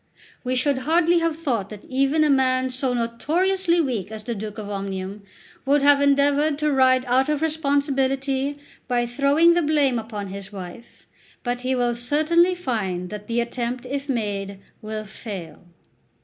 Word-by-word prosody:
We 255 0 -1
should 260 +1 +1
hardly 335 +5 +3
have 330 -1 0
thought 235 -11 -2
that 210 -2 -10
even 275 +4 +2
a 305 - +3
man 260 -1 +2
so 255 0 -1
notoriously 340 +10 +1
weak 230 - -3
as 215 -1 -7
the 235 - -3
Duke 215 0 -6
of 210 -2 -6
Omnium 195 0 -5 0.4
would 280 +1 +2
have 285 0 +5
endeavoured 285 +1 +3
to 300 0 0
ride 260 -1 +4
out 260 +3 +2
of 300 0 0
responsibility 280 -2 0 0.3
by 245 -1 +1
throwing 280 +7 +4
the 345 - +2
blame 290 -5 +2
upon 210 -3 -6
his 195 +1 -7
wife; 190 +3 -10 0.4
but 245 0 -2
he 260 +1 0
will 245 -1 +1
certainly 310 +9 +2
find 195 - -3
that 210 0 -7
the 235 0 0
attempt, 240 +1 -4
if 280 +2 -4
made, 200 -5 -2 0.2
will 215 -1 -5
fail. 195 -5 -8
255 Hz, 165 wpm, -23 LUFS, 220-290 Hz, 0.4 s, have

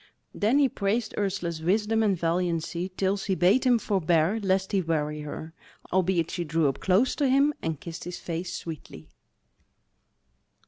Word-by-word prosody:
Then 220 +6 +2
he 285 -2 +5
praised 220 0 -1
Ursula's 180 -5 -2
wisdom 210 +6 +1
and 200 -4 +2
valiancy 170 +1 -1
till 195 +1 +1
she 195 -1 -1
bade 185 - +3
him 245 -1 +5
forbear 185 -2 +1
lest 190 -1 0
he 195 -2 +2
weary 150 -3 -1
her. 155 +2 -7 0.4
Albeit 180 -3 +1
she 175 - -2
drew 160 -1 +1
up 135 - -2
close 195 +8 +2
to 280 -3 +2
him 280 +3 +4
and 160 -3 -3
kissed 165 -1 -8
his 175 0 -5
face 175 +1 -4
sweetly. 140 - -8
185 Hz, 155 wpm, -27 LUFS, 165-205 Hz, 0.4 s, he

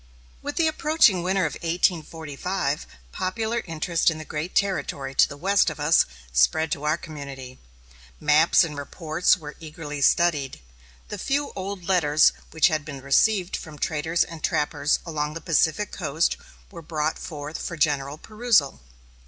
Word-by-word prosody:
With 290 +1 -5
the 335 - +2
approaching 305 - +3
Winter 185 +1 +1
of 155 - -2
1845 165 -2 -1 0.2
popular 220 - -2
interest 165 +1 +1
in 160 - -3
the 155 - -8
great 155 +5 -5
territory 160 -8 -1
to - - +4
the 140 - -8
west 195 +3 +3
of 160 - -8
us 150 +3 +4 0.3
spread 160 - +3
to 150 -2 -2
our 150 - +2
community. 140 -5 -9 0.6
Maps 155 +4 +5
and 155 -3 -4
reports 155 +5 +1
were 150 -3 -9
eagerly 150 -2 -7
studied. 145 -2 +2 0.5
The - - -5
few 285 +1 -1
old 195 -1 -5
letters 155 -5 +4 0.2
which 160 - +4
had 155 -1 -1
been 140 -2 -8
received 180 +7 +2
from 155 -2 -8
traders 160 +3 0
and 165 -3 -10
trappers 150 0 +1
along 150 -2 -3
the - - -4
Pacific 165 +5 +1
coast 160 -2 0 0.4
were 170 -4 -9
brought 155 -1 -2
forth 150 -1 -6
for 170 - -5
general 145 -1 0
perusal. 215 - +1
160 Hz, 155 wpm, -24 LUFS, 150-180 Hz, 0.6 s, Maps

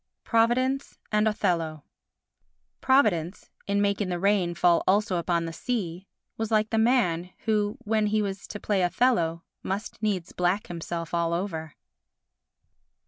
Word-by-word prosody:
Providence 255 +4 +1
and 210 0 +3
Othello 165 -8 -1 1.0
Providence, 210 - +2 0.2
in 200 0 +2
making 200 -1 0
the 175 - -1
rain 185 -2 +1
fall 170 0 +4
also 195 -1 +2
upon 170 0 0
the 165 - -5
sea, 190 -4 -3 0.3
was 225 -1 -2
like 215 -1 +2
the 225 - +2
man 180 -8 +2 0.2
who, 210 0 +1
when 215 -1 +1
he 215 +1 +1
was 200 -1 -3
to 205 - -7
play 200 -2 0
Othello, 175 -4 +1 0.2
must 200 +2 -4
needs 195 -5 -1
black 180 +3 0
himself 170 -1 -5
all 170 -1 +1
over. 165 -4 -3
195 Hz, 140 wpm, -26 LUFS, 170-215 Hz, 1.0 s, fall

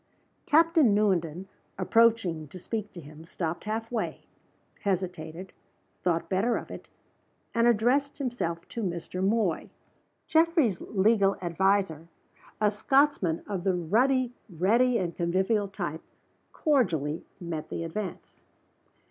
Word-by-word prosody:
Captain 320 - +5
Newenden, 185 -4 +1 0.3
approaching 195 -6 +2
to 185 - -11
speak 210 +3 -4
to 175 - -10
him, 155 0 -12
stopped 165 +1 -4
half 225 +2 -3
way, 230 -3 -3 0.5
hesitated, 180 -2 -3 0.5
thought 170 -2 0
better 205 +6 +1
of - - -8
it - - -9 0.6
and 230 0 +3
addressed 245 +5 +2
himself 235 - -3
to 230 - -5
Mr. 180 -1 -3
Moy. 200 -4 +1 0.6
Geoffrey's 320 - +2
legal 200 -1 +2
adviser 180 -2 0 0.5
a 210 -1 +3
Scotchman 240 - +2
of 195 -4 -3
the 190 -2 +2
ruddy, 245 +9 +2 0.2
ready, 230 +8 +3
and 175 -4 -2
convivial 190 +4 +1
type 175 -5 -5 0.5
cordially 170 - +1 0.2
met 170 -4 -5
the - - -4
advance. 180 +3 -6
195 Hz, 115 wpm, -28 LUFS, 170-230 Hz, 0.6 s, Captain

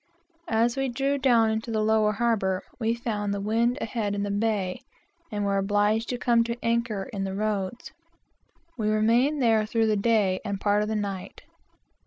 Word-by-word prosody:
As 230 +1 +2
we 270 -1 -1
drew 275 +3 -1
down 235 -4 +4
into 220 +2 -3
the 215 -1 0
lower 215 -1 +3
harbor, 200 -4 0 0.2
we 230 0 0
found 210 -4 -3
the - - -3
wind 230 +5 +1
ahead 215 -3 -2
in 200 - -2
the 205 - -2
bay, 205 -1 -1 0.5
and 205 -1 -2
were 200 0 +1
obliged 205 +3 +1
to 245 - -2
come 235 -1 +3
to 235 0 -3
anchor 230 -3 0
in 195 -1 -2
the 190 0 -3
roads. 210 +1 -3 0.9
We 215 -2 0
remained 235 +7 +2
there 225 -2 +4
through 225 0 +1
the 215 -1 +2
day 200 -3 +2
and 200 -2 -2
a - - -7
part 205 +1 +2
of 210 - -2
the 220 - -1
night. 200 -2 -5
220 Hz, 190 wpm, -26 LUFS, 205-235 Hz, 0.9 s, down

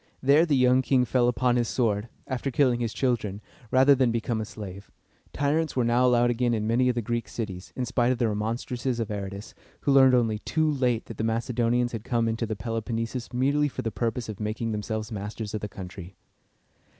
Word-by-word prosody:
There 145 +5 +4
the 150 - +3
young 125 0 +4
king 130 -1 +2
fell 125 -1 +2
upon 125 0 +2
his 120 -1 +1
sword, 110 -3 0 0.2
after 130 +1 -3
killing 125 -2 +2
his 115 -2 -1
children, 115 -6 -1 0.3
rather 130 +3 +6
than 130 -3 +2
become 115 -1 -1
a - - -3
slave. 100 -2 -9 0.4
Tyrants 150 +3 0
were 125 - +2
now 120 +2 +3
allowed 120 -1 +4
again 120 0 +1
in 105 -1 -2
many 120 +3 +2
of 125 - 0
the 120 - -1
Greek 120 +2 -2
cities, 95 -5 -6
in 125 - -2
spite 125 0 +1
of 130 - 0
the 120 -1 +1
remonstrances 115 +4 -2
of 110 -2 -2
Aratus, 100 0 -6 0.3
who 140 - +1
learned 130 -2 +6
only 115 -3 +1
too 155 +7 0
late 125 -6 0
that 115 - -9
the - - -2
Macedonians 120 +1 0
had 115 -2 -5
come 115 -1 0
into 115 +1 -1
the 110 - -3
Peloponnesus 115 +2 -3
merely 140 +4 +2
for 140 - -5
the 115 - -2
purpose 115 +1 -2
of 110 -2 -7
making 110 +2 -2
themselves 110 +1 -3
masters 105 +1 -5
of 110 - -3
the 105 - -4
country. 95 -1 -9
120 Hz, 210 wpm, -26 LUFS, 110-125 Hz, 0.4 s, rather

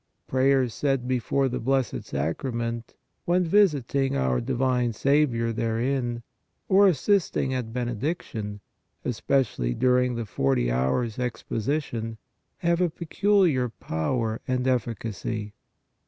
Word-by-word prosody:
Prayers 130 -2 +2
said 135 -3 0
before 130 +2 +1
the 125 0 -2
Blessed 130 +1 0
Sacrament, 115 - -3 0.3
when 180 +1 +3
visiting 145 - +2
our 65 -2 +1
divine 125 - 0
Saviour 125 -3 +2
therein, 120 +1 -1 0.4
or 195 +1 +6
assisting 175 -5 +1
at 125 -3 -3
Benediction, 120 - -3 0.4
especially 110 - 0
during 125 - +2
the 115 -1 -3
40 65 - +1
Hours 85 - 0
Exposition, 115 -1 -2 0.4
have 170 0 +1
a 180 - +3
peculiar 170 -5 +2
power 110 +5 -2
and 125 0 0
efficacy. 115 -3 -2
125 Hz, 105 wpm, -26 LUFS, 115-135 Hz, 0.4 s, or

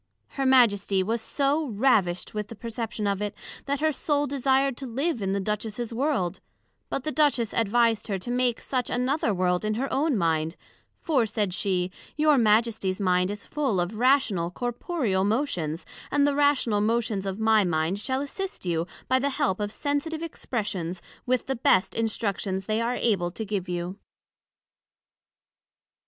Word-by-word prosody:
Her 270 -1 -1
Majesty 205 -7 +4
was 225 +4 -1
so 285 +5 0
ravished 205 -6 +1
with 210 -1 -3
the 230 - -9
perception 225 -1 -4
of 200 0 0
it, 205 0 -3 0.3
that 280 0 -1
her 315 0 +3
Soul 290 0 0
desired 270 -1 +1
to 270 - -5
live 270 +2 -1
in 195 -1 -1
the 200 - 0
Duchess's 215 +3 -3
World: 250 - 0 0.5
But 270 - -2
the 310 - -2
Duchess 275 -6 +2
advised 230 0 +2
her 200 -3 -1
to 215 +6 -6
make 245 -1 +1
such 255 -3 -2
another 250 0 +1
World 180 -1 +1
in 215 0 0
her 265 +4 -2
own 285 -2 +2
mind; 165 -2 0 0.5
for, 265 -8 +2
said 210 -3 -1
she, 180 -1 0 0.3
your 300 -2 +4
Majesty's 215 -3 +2
mind 180 -1 +2
is 205 0 -6
full 270 -10 0
of 175 +4 -1
rational 245 -10 +3
corporeal 240 - -1
motions; 195 - -1 0.2
and 285 -1 +3
the 290 - +2
rational 280 -7 +2
motions 215 -2 0
of 190 0 -3
my 220 -1 +4
mind 170 +2 0
shall 260 +4 -1
assist 375 - -5
you 170 -1 0 0.2
by 260 0 +3
the 280 +2 +1
help 190 -8 0
of 205 0 -2
sensitive 300 +5 -2
expressions, 200 - -3 0.3
with 255 -1 +1
the 265 - -1
best 200 -5 +3
Instructions 200 -4 -2
they 215 +2 0
are 240 +2 0
able 195 -9 +1
to 220 +5 -5
give 195 -3 -3
you. 175 +2 -4
225 Hz, 165 wpm, -26 LUFS, 195-265 Hz, 0.5 s, Majesty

